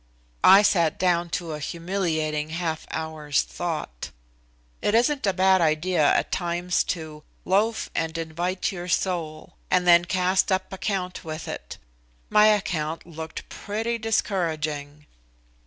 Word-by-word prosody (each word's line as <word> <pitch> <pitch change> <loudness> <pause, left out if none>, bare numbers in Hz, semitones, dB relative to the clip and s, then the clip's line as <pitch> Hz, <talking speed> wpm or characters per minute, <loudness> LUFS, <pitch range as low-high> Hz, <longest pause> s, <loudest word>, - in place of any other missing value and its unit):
I 195 +2 +8
sat 170 -6 +3
down 175 -2 +1
to 170 -2 -6
a 150 - -4
humiliating 160 -2 -2
half 165 -1 -3
hour's 155 -3 -1
thought. 155 - -5 0.7
It 205 - +1
isn't 255 +1 +2
a - - +4
bad 190 0 +4
idea 155 0 +2
at - - 0
times 175 0 0
to 155 -3 -5 0.2
"loaf 215 +4 +1
and 165 0 -2
invite 170 +5 -2
your 175 -2 -6
soul," 170 -4 -2
and 180 -1 +2
then 175 0 +6
cast 185 0 +1
up 190 0 -1
account 185 -2 -3
with 155 0 -6
it. - - -7 0.5
My 210 0 +6
account 165 -7 0
looked 160 -1 -8
pretty 225 +3 -3
discouraging. 155 -9 -2
175 Hz, 130 wpm, -25 LUFS, 160-190 Hz, 0.7 s, I